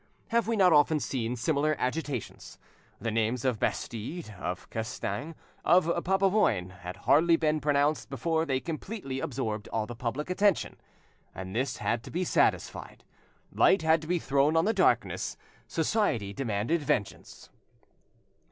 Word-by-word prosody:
Have 230 -1 +1
we 230 - +1
not 185 -5 +5
often 150 +1 +4
seen 125 -4 -2
similar 150 +4 +1
agitations? 130 -2 -4 0.4
The 115 +2 -2
names 115 +3 0
of 125 -5 +1
Bastide, 120 +3 -3
of 90 -1 -4
Castaing, 130 +7 -4 0.3
of 175 +1 +5 0.2
Papavoine, 190 - +2
had 90 0 -7
hardly 165 +3 +5
been 155 -1 +1
pronounced 145 +1 +1
before 160 +5 0
they 135 -4 0
completely 160 -3 -5
absorbed 110 -6 -3
all 110 -1 -2
the 120 - -7
public 130 +8 -3
attention, 200 -1 +1 0.6
and 95 +2 -7
this 130 +1 -1
had 115 -1 -1
to - - -8
be 180 +2 -1
satisfied, - - 0 0.5
light 190 - +4
had 160 0 +4
to 155 - -9
be 180 +1 +1
thrown 140 +1 +2
on 160 - +3
the 220 - +2
darkness: - - +1 0.3
society 155 - 0
demanded 115 +7 -1
vengeance. 100 -8 -3
145 Hz, 145 wpm, -29 LUFS, 115-165 Hz, 0.6 s, not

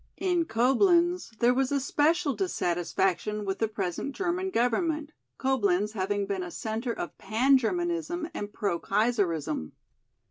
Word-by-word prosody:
In 355 -3 +1
Coblenz 340 - +3
there 240 +2 +4
was 265 +1 0
especial 290 +3 +2
dissatisfaction 190 +1 -1
with 195 0 -2
the 225 - +2
present 205 +6 -3
German 370 0 -1
government, 305 +3 0 0.3
Coblenz 210 -7 +1
having 205 0 -1
been 195 -1 -2
a 180 - -5
centre 225 +6 -3
of 175 - -6
pan 235 +7 +3
Germanism 340 +5 -1
and 205 0 -5
pro 195 -5 -1
Kaiserism. 175 - 0
235 Hz, 130 wpm, -28 LUFS, 200-315 Hz, 0.3 s, there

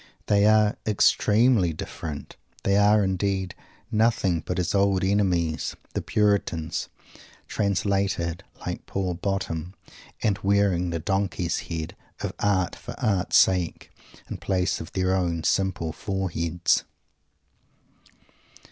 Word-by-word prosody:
They 105 0 +4
are 110 -1 +4
extremely 105 -2 +3
different. 75 -1 -7 0.3
They 100 - +2
are, 105 +1 +5
indeed, 95 -1 -1 0.4
nothing 110 -6 +2
but 90 - -3
his 90 - 0
old 100 -2 +2
enemies, 90 -5 +1 0.2
the - - -1
Puritans, 95 -6 0 0.6
"translated," 95 -3 0 0.2
like - - -5
poor 95 -2 -2
Bottom, 90 -2 -3 0.5
and 100 -3 +1
wearing 100 -3 +2
the 85 - -2
donkey's 90 0 -1
head 80 -2 -4 0.3
of - - -3
"art 95 -3 +1
for - - -9
art's 100 -3 +2
sake" 95 -4 +2 0.4
in - - -5
place 90 -2 0
of 80 - -9
their 95 0 +1
own 85 -3 -1
simple 95 -5 0
foreheads. 90 -4 0
95 Hz, 110 wpm, -25 LUFS, 85-100 Hz, 0.6 s, are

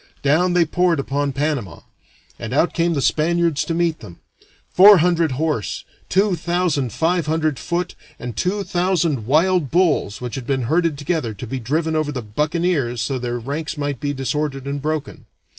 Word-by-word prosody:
Down 170 +6 +3
they 175 -1 +4
poured 175 0 +1
upon 140 +1 -1
Panama, 140 -6 -2 0.6
and - - -4
out - - +2
came 170 0 +1
the 140 - 0
Spaniards 165 -1 +1
to 165 - -2
meet 170 -2 0
them; 85 - -12 0.5
four 200 +2 +8
hundred 170 -3 +2
horse, 150 -5 -2 0.2
two 195 0 +2
thousand 170 -6 -1
five 165 - 0
hundred 155 -2 0
foot, 175 +1 -2 0.2
and 120 -1 -6
two 200 +3 -1
thousand 175 - 0
wild 165 +1 +2
bulls 165 - +1
which 125 -2 -6
had 125 -1 -6
been 135 -2 0
herded 160 +4 +1
together 145 -7 -2
to 100 - -7
be 130 +3 -4
driven 155 +7 -1
over 155 -1 0
the 125 -4 -5
buccaneers 150 +1 -1
so 130 +3 -1
that - - -10
their 120 0 -2
ranks 145 +7 -4
might 145 -3 -3
be 145 - -2
disordered 135 0 -2
and 140 0 -3
broken. 155 0 -4
155 Hz, 175 wpm, -20 LUFS, 135-170 Hz, 0.6 s, four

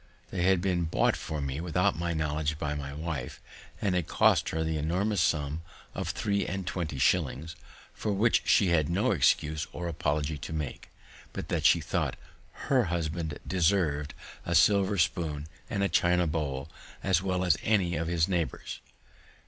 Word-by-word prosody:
They 90 - -2
had 95 0 +3
been 90 -3 +1
bought 80 - +2
for 75 -1 -4
me 70 +2 -3
without 90 +1 +1
my 85 +1 -2
knowledge 75 -1 -1
by 75 -1 -2
my 70 -1 -5
wife, 75 -3 -5 0.4
and 100 -3 0
had 90 -3 0
cost - - +3
her 80 0 -1
the 80 -1 -1
enormous 90 +5 0
sum 75 -1 0 0.3
of - - -3
three 100 -1 0
and 95 -1 -4
twenty 85 -5 -3
shillings, 75 +4 +1 0.4
for 105 - -2
which 105 +4 +3
she 100 - +4
had 80 -3 +2
no 95 +5 +1
other - - +2
excuse 75 +4 +2
or 85 - -5
apology 75 -2 -1
to 80 - -6
make, 75 -4 -5 0.4
but - - -6
that - - -1
she - - +4
thought - - -1 0.5
her 130 -4 +3
husband 80 -2 -2
deserv'd 80 -5 +1 0.3
a - - -1
silver 100 0 +4
spoon 80 -3 0 0.2
and 100 -2 +1
China 90 0 +3
bowl 75 -4 -2 0.4
as 95 -3 +3
well 95 -1 0
as 85 -5 +4
any 95 -6 +2
of 80 +2 -2
his 85 -2 +2
neighbors. 90 -4 -2
85 Hz, 170 wpm, -29 LUFS, 75-90 Hz, 0.5 s, she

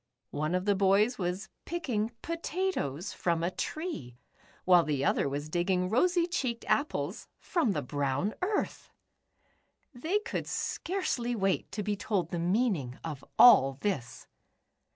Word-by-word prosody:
One 155 +4 -1
of 185 +1 -1
the 205 - +4
boys 200 +5 +3
w^as 185 +1 -3 0.2
picking 245 -11 -2
potatoes 335 - -2
from 170 -2 0
a 175 - 0
tree, 185 - -5 0.5
while 180 -1 +7
the 140 -3 -1
other 140 - +2
was 145 +2 -4
digging 180 +3 0
rosy 345 +8 +3
cheeked 260 -10 -2
apples 185 - -1
from 325 - 0
the 150 - -2
brown 145 - -1
earth!! 400 +3 -2 1.0
They 315 +11 0
could 425 +3 -4
scarcely 265 -10 -2
wait 195 -3 0
to 210 - -2
be 205 +1 -1
told 200 -5 -1
the 175 - -2
meaning 175 - 0
of 150 -5 -6
all 135 - +8
this. 185 - -3
195 Hz, 135 wpm, -30 LUFS, 160-250 Hz, 1.0 s, all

